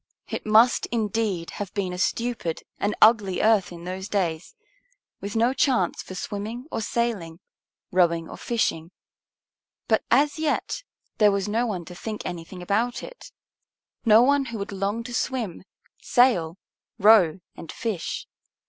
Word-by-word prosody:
It - - -5
must, 225 +3 +5
indeed, 210 -6 -1
have 200 -3 -6
been 190 -3 -1
a 180 - -6
stupid 230 -5 -1 0.2
and 205 +1 0
ugly 210 -4 +4
earth 215 -4 +3
in 170 -1 -9
those 190 +3 -5
days, 175 -6 -2 0.6
with 200 +2 -6
no 235 +3 +3
chance 255 - +1
for 185 - -9
swimming 215 +6 -5
or - - -2
sailing, 205 -8 -2 0.5
rowing 170 -2 +2
or - - -8
fishing. 170 -8 -1 1.0
But 220 - +2
as 290 +4 +3
yet 315 +9 -1 0.4
there 210 -1 +6
was 200 0 -1
no 230 +4 0
one 185 -6 -4
to 180 - -10
think 215 +4 -6
anything 175 +1 -6
about 220 +6 0
it, - - -11 0.7
no 225 +1 +7
one 280 +1 +3
who 235 -3 -5
would 200 0 -5
long 200 +4 -2
to 245 +1 -8
swim, 230 - -2 0.3
sail, 190 -10 +3 0.4
row, 195 -5 +5 0.2
and 160 - -9
fish. 220 -7 -4
210 Hz, 150 wpm, -25 LUFS, 180-235 Hz, 1.0 s, no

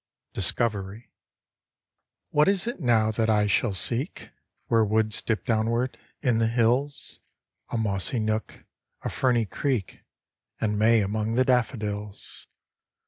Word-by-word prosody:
DISCOVERY 105 0 -2 1.2
What 150 0 +4
is 195 -2 +1
it 240 -3 -4
now 115 -6 +3
that 110 0 0
I 105 -1 +3
shall 105 +2 +2
seek, 120 - -1 0.3
Where 115 -1 +3
woods 110 0 +1
dip 110 -2 -2
downward, 115 +3 0 0.3
in 120 -5 +2
the 115 - +3
hills? 125 +5 0 0.5
A - - -2
mossy 105 +2 -1
nook, 110 0 -2 0.4
a - - -3
ferny 120 -3 +1
creek, 120 -1 -3 0.6
And 105 -1 0
May 110 +1 +5
among 110 +3 -1
the 130 +1 +3
daffodils. 105 -5 -2
110 Hz, 125 wpm, -26 LUFS, 105-125 Hz, 1.2 s, May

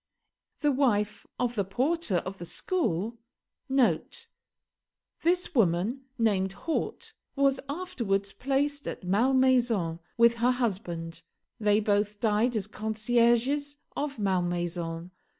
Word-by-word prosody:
The 295 -2 +3
wife 225 -7 +1
of 245 -1 0
the 205 -4 0
porter 255 - 0
of 190 +1 -6
the 175 - -6
school, 230 - -1 0.5
[This 335 - -2
woman, 220 - +1
named 195 -5 +1
Haute, 445 - -3 0.2
was 275 -1 +3
afterwards 225 - -2
placed 285 +2 -1
at - - -5
Malmaison, 235 -4 +2 0.2
with 235 0 +5
her 245 +2 +3
husband. 180 -9 -3 0.4
They 210 -1 +3
both 205 0 +1
died 220 +3 +2
as 210 -3 0
concierges 235 +7 +1 0.2
of 285 -2 -3
Malmaison. 175 -3 -1
230 Hz, 105 wpm, -28 LUFS, 195-270 Hz, 0.5 s, with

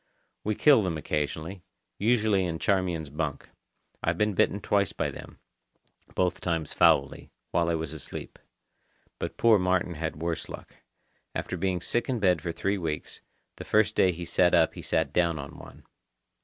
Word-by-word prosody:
We 105 0 0
kill 140 -2 +6
them 90 -5 -1
occasionally, 80 +4 -3 0.4
usually 110 -3 +3
in 85 -2 -2
Charmian's 90 -6 0
bunk. 75 -2 -3 0.5
I've - - 0
been 105 -1 +2
bitten 95 +2 +2
twice 100 -2 +1
by - - -1
them, - - -11 0.8
both 90 -2 0
times 80 -4 -2
foully, 70 0 +3 0.2
while 85 -1 +2
I 85 - +2
was 80 -3 -4
asleep. - - -8 0.8
But - - -4
poor 115 -3 +5
Martin 90 -1 +1
had 80 0 -3
worse 85 +1 -3
luck. - - -10 0.6
After - - -3
being 95 -2 -1
sick 120 +7 -1
in 125 -3 0
bed 90 -6 +3
for 85 - -3
three 100 +4 -1
weeks, 80 -3 -4 0.4
the - - -7
first 110 0 +3
day 95 - +4
he 85 0 -6
sat 90 +1 +3
up 80 -1 +4
he - - -8
sat - - 0
down 85 -2 +2
on 70 -1 -8
one. - - -13
90 Hz, 170 wpm, -28 LUFS, 80-100 Hz, 0.8 s, kill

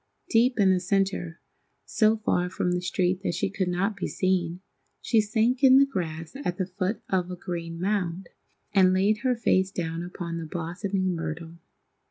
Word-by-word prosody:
Deep 240 +1 +3
in 195 -2 +5
the 185 - +1
centre, 190 -3 -1 0.5
so 220 0 +3
far 180 -4 0
from 180 0 -1
the 180 0 0
street 180 +1 0
that 170 - -2
she 180 - -1
could 195 -2 -1
not 190 +4 0
be 200 - -3
seen, 180 -2 0 0.4
she 225 -3 +2
sank 225 +5 0
in 265 0 +8
the 275 - +7
grass 165 -6 -5
at 175 0 -2
the 185 - 0
foot 185 +3 -3
of 180 -2 0
a 180 - -4
green 170 -1 -5
mound, 185 -2 -1 0.5
and 185 -2 +5
laid 200 +3 +3
her 255 0 +1
face 190 -5 +2
down 165 -3 -3
upon 175 -1 -5
the 165 - -5
blossoming 185 +3 -2
myrtle. 165 0 -5
185 Hz, 180 wpm, -26 LUFS, 175-205 Hz, 0.5 s, in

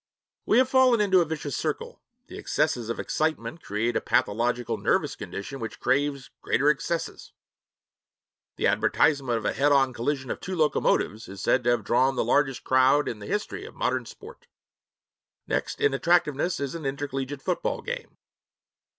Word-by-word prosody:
We - - +4
have 255 0 +5
fallen 260 -3 +4
into 190 -3 +4
a - - +1
vicious 150 -3 -4
circle: - - -4 0.2
the - - -11
excesses 115 -2 -1
of 115 - -3
excitement 160 +1 -2
create 115 +4 -2
a - - +1
pathological 120 +3 0
nervous - - +1
condition 135 +7 -7
which 115 -2 -6
craves 140 0 0
greater 140 +5 +3
excesses. 165 +3 -4 1.2
The - - -2
advertisement 140 -6 +2
of 110 - -6
a - - +1
head 145 +2 +2
on 135 -2 +3
collision 130 +2 -2
of - - -4
two 185 - -5
locomotives 145 - +1
is 95 0 -9
said 125 - +2
to - - +3
have 120 - +1
drawn 130 +3 +2
the - - 0
largest 135 -3 +1
crowd 130 +3 +4
in 110 - -4
the 100 - -9
history 210 - -3
of 450 - -11
modern - - -1
'sport'; 475 +3 -13 1.0
next - - -2
in 435 -1 +2
attractiveness 170 -1 +1
is 140 -2 -3
an 165 -2 -6
intercollegiate 135 0 -4
football 180 - -2
game. 485 +1 -6
140 Hz, 165 wpm, -26 LUFS, 125-170 Hz, 1.2 s, have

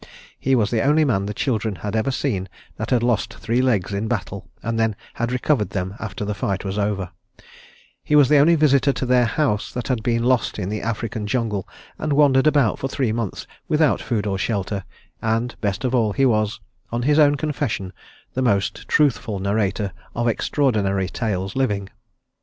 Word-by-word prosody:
He 135 0 +2
was 110 -4 +1
the 115 -2 +1
only 150 +2 +4
man 100 -7 +1
the - - -2
children 110 -5 -1
had 105 +4 -4
ever 110 +4 +1
seen 105 -9 -2 0.3
that - - -4
had 120 -2 +2
lost 120 -2 0
three 115 +2 0
legs 105 -7 +1
in 100 +3 -1
battle 100 -4 -4
and 115 0 -1
then 110 -2 +1 0.2
had 115 +1 -2
recovered 125 -5 +1
them 95 0 -3
after 105 -1 -5
the 105 - -2
fight 100 -1 -2
was 95 +2 -2
over; 100 -3 -1 0.9
he 150 - +1
was 145 -3 +7
the 150 +1 +5
only 165 +4 +6
visitor 140 -2 +3
to 130 - -3
their 125 -1 +4
house 115 -4 0
that 125 +1 -5
had 125 -4 0
been 115 +1 0
lost 125 -1 +1
in 95 -3 -3
the 105 0 -3
African 110 -1 -3
jungle 110 -5 -1 0.3
and 155 -2 -1
wandered 140 -1 +4
about 145 -7 +3
for 135 - -2
three 130 -3 -1
months 115 -3 -3 0.2
without 155 -2 +2
food 110 -4 -1
or 95 -2 -1
shelter, 100 -2 -2 0.4
and 115 +2 0
best 100 +3 -1
of 125 - 0
all 110 -5 +2
he 135 - +2
was, 110 -3 +1 0.3
on 120 +1 -1
his 150 +3 +3
own 145 -1 +6
confession, 135 -10 -2 0.4
the 130 - -1
most 100 -6 0
truthful 125 -8 +2
narrator 100 0 -1 0.2
of 120 +1 0
extraordinary 105 -7 +1
tales 95 -5 -2
living. 105 -7 0
115 Hz, 190 wpm, -22 LUFS, 100-130 Hz, 0.9 s, was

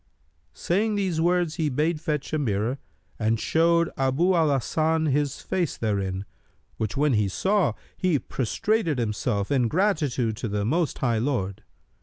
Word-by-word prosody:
Saying 210 +5 0
these 185 -5 0
words, 175 -1 +1
he 160 -3 +1
bade 150 +4 0
fetch 150 -2 -3
a 155 - +1
mirror 115 +1 -1 0.4
and 110 0 +1
showed 170 +3 +2
Abu 135 +8 +2
al 165 -3 +3
Hasan 160 +4 +1
his 145 -1 0
face 175 -5 -2
therein, 100 -3 -2 0.5
which 110 0 -3
when 145 -1 +3
he 105 -2 +2
saw, 195 - +1 0.2
he 180 -5 +2
prostrated 165 - -1
himself, 105 -2 -1
in 130 -4 +3
gratitude 150 - +1
to 115 - -3
the 100 -1 -1
Most 160 +5 0
High 120 -4 +1
Lord. 110 -7 -2
145 Hz, 150 wpm, -25 LUFS, 115-170 Hz, 0.5 s, al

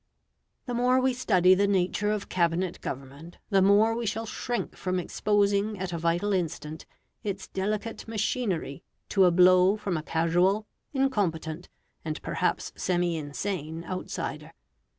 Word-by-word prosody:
The 245 - -4
more 250 +2 +3
we 260 0 +2
study 185 -8 +4
the 200 +2 +3
nature 200 +1 +1
of 210 -1 -2
Cabinet 175 0 0
government, 140 +6 -7
the 195 -1 +5
more 205 +4 +5
we 235 -1 -2
shall 225 +2 -2
shrink 240 +2 -3
from 185 0 -2
exposing 205 +2 +1
at 185 -1 -4
a 170 - -2
vital 170 +5 +1
instant 160 -3 -3 0.4
its 200 -2 -4
delicate 210 +4 -3
machinery 210 - -2 0.3
to 195 -2 +4
a 180 - +5
blow 185 +3 +5
from 195 -5 -2
a - - -3
casual, 175 +6 +1 0.3
incompetent, 180 - -1 0.3
and 155 -1 -4
perhaps - - -1
semi 175 -2 0
insane 160 +2 -4
outsider. 185 +1 -5
185 Hz, 140 wpm, -27 LUFS, 170-210 Hz, 0.4 s, the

